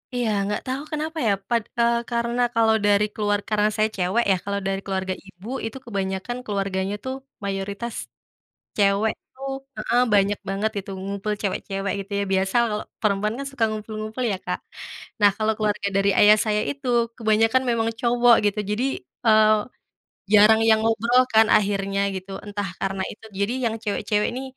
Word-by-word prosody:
Iya 245 -2 0 0.2
gak 210 - -2
tau 260 +2 -3
kenapa 310 +1 -3
ya - - +4 0.2
pad 235 -2 +1 0.2
eee, 235 0 +3
karena 235 +1 0
kalau 225 -1 +4
dari 205 0 +4
keluar 205 -1 0
karena 210 0 +2
saya 215 0 +2
cewek 190 +6 +1
ya - - +4
kalau 200 0 -1
dari 195 0 -1
keluarga 190 -1 -2
ibu 195 +4 -12 0.2
itu 225 +4 -5
kebanyakan 195 +2 -3
keluarganya 195 -1 -2
tuh 260 0 -3 0.3
mayoritas, 200 +4 -4 0.8
cewek 200 +2 +3 0.2
tuh, 270 +1 -6 0.3
heeh, 240 +3 +2
banyak 200 0 +3
banget 200 +3 0
gitu 195 - -5
ngumpul 200 +2 -3
cewek-cewek 195 -1 -2
gitu 200 - -25
ya 200 - +1
biasa 190 +3 0
kalau 210 -1 -2 0.2
perempuan 210 0 +1
kan 275 - -4
suka 255 -5 -2
ngumpul-ngumpul 215 +2 -5
ya - - 0
Kak, - - -2 0.6
nah 205 - +7
kalau 220 0 +1
keluarga 210 -2 -1
dari 195 0 +3
ayah 210 +1 +8
saya 210 0 +1
itu 275 -2 -8 0.3
kebanyakan 225 +2 +3
memang 225 -1 +1
cowok 240 0 +5
gitu 205 +1 +1
jadi, 225 +5 0 0.4
eee, 215 0 +6 0.8
jarang 215 +2 +7
yang 220 0 +5
ngobrol 230 +3 +3
kan 220 0 +7
akhirnya 195 -1 0 0.2
gitu 190 +1 -8 0.2
entah 205 -2 -3
karena 195 0 -2
itu 220 - -14
jadi 200 +4 +1 0.2
yang 220 - -4
cewek-cewek 210 0 0
ini, 255 - -4
210 Hz, 165 wpm, -23 LUFS, 200-230 Hz, 0.8 s, ayah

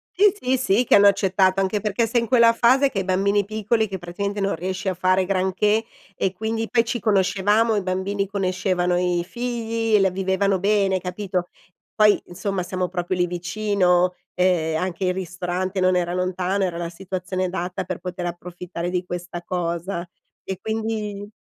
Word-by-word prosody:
Sì, 405 +2 +6
sì, 255 +1 +1
sì 245 -2 +2
che - - +2
hanno 205 0 +8
accettato, 190 -1 +3
anche 195 +2 0
perché 215 +2 0
sei 230 +1 +1
in 235 - -3
quella 235 -1 +5
fase 260 +4 +4
che 215 -7 -3
hai - - -1
i - - -11
bambini 200 +2 +2
piccoli 220 +1 0
che, 190 -1 -5
praticamente, 200 +4 -4
non 195 0 +1
riesci 185 +3 -4
a 190 - +1
fare 185 +1 +2
granché 195 +4 +1 0.3
e 190 - -1
quindi 220 +3 -3
poi 230 -2 +3
ci 240 +1 -2
conoscevamo, 205 +2 +2
i 205 - +1
bambini 190 +2 -2
conoscevano 185 -2 0
i 175 -1 +1
figli, 230 -1 -1
e 210 - +6
la 190 -1 +3
vivevano 190 0 +1
bene, 195 -1 +2
capito, 180 -1 -3 0.5
poi 210 -1 +5
insomma 185 +1 -3
siamo 180 0 -2
proprio 175 0 -2
lì 180 -1 +2
vicino, 180 0 +1 0.2
uhm, 175 -3 +2
anche 185 +2 -2
il 180 0 +1
ristorante 185 +1 -3
non 185 0 +3
era 175 -1 0
lontano, 185 +2 -1
era 175 -3 -1
la 170 -1 -3
situazione 185 +1 -4
adatta 180 +1 -3
per 185 0 -4
poter 180 -1 -5
approfittare 175 0 -6
di 180 0 -1
questa 175 -1 -6
cosa, 175 0 -3 0.4
e 190 -1 -5
quindi 215 -2 -3
190 Hz, 180 wpm, -23 LUFS, 180-210 Hz, 0.5 s, hanno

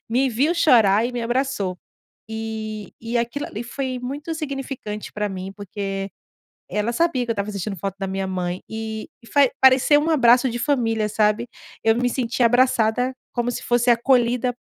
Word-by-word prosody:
me 260 +3 +2
viu 270 +8 +2
chorar 230 - +5
e 250 - -5
me 240 -1 -3
abraçou. 240 -7 -1 0.5
E 220 -2 -5
e 230 +1 -1
aquilo 235 +5 -2
ali 220 +3 -6
foi 255 +1 -4
muito 285 +6 -5
significante 270 -8 -5
pra 210 0 -2
mim, 190 0 -6
porque 195 -1 -4 0.6
ela 210 +4 -1
sabia 275 -3 +1
que 235 - -1
eu - - +1
estava 205 0 -3
sentindo 200 0 -4
falta 195 +3 -4
da 195 - -2
minha 190 0 -2
mãe 180 -1 -3
e 220 0 -5 0.2
e - - -15
faz 280 -1 +4
pareceu 265 +3 +6
um 315 - 0
abraço 250 -3 +5
de 240 - -4
família, 225 -6 +1
sabe. 215 +2 +1 0.4
Eu 225 0 +4
me 245 +1 +1
senti 245 0 -1
abraçada, 245 0 +3 0.2
como 240 0 -1
se - - -5
fosse 240 0 +2
acolhida 245 0 +2
235 Hz, 175 wpm, -22 LUFS, 210-255 Hz, 0.6 s, pareceu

